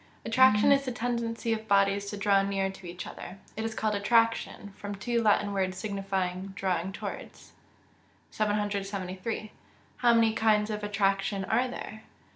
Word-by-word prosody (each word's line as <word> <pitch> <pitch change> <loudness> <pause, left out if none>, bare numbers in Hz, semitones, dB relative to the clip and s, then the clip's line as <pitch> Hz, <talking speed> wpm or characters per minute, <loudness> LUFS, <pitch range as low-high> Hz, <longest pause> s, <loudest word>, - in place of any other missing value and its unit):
_ - - -27 0.2
Attraction 225 -1 +5
is 275 0 +4
the 260 - -3
tendency 235 -1 -2
of 220 0 -5
bodies 200 0 +2
to 205 - -5
draw 200 -1 +3
near 195 -1 -1
to 190 -1 -11
each 175 +1 -7
other. 180 +2 -9 0.2
It 220 - -3
is 225 0 -3
called 215 -1 0
attraction, 225 -1 +1
from 205 0 -6
two 235 +3 -1
Latin 205 -2 +2
words 190 -1 -1
signifying 195 -2 -3
drawing 185 -1 -1
towards. 195 - -8 0.8
773. 205 0 -2 0.5
_How 240 -1 +5
many 225 -1 +4
kinds 215 -1 +2
of 210 0 -4
attraction 195 -1 0
are 250 +6 +1
there? 220 -3 -7
205 Hz, 155 wpm, -29 LUFS, 195-225 Hz, 0.8 s, Attraction